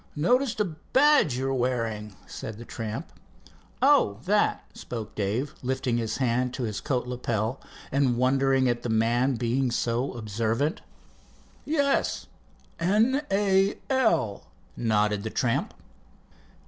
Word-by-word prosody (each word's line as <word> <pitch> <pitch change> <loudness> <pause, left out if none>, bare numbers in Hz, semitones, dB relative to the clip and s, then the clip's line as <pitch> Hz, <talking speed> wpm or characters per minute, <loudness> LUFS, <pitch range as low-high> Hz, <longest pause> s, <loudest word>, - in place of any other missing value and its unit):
"Noticed 240 - +1
a 210 - +3
badge 190 - +3
you're 135 +1 -1
wearing," 115 -5 -2
said 110 - -7
the 120 - -9
tramp. 110 -2 -6 0.7
"Oh, 100 -1 +4
that?" 205 +2 +2
spoke 115 -3 -7
Dave 110 +8 -2
lifting 130 -2 -1
his 115 -2 -2
hand 125 0 0
to 130 - -3
his 105 -3 -3
coat 125 -3 -1
lapel, 120 -1 -2 0.3
and 135 -3 +2
wondering 135 +1 +3
at 120 -1 0
the 120 - -4
man 120 +4 +2
been 125 +3 0
so 120 +2 -1
observant. 115 - -1 0.8
"Yes 285 -2 +1 0.5
N. 220 +11 +3
A. 195 0 +2
L.," 170 - +1 0.3
nodded 105 -2 +1
the 110 - -4
tramp. 115 +1 0
125 Hz, 120 wpm, -26 LUFS, 115-155 Hz, 0.8 s, Oh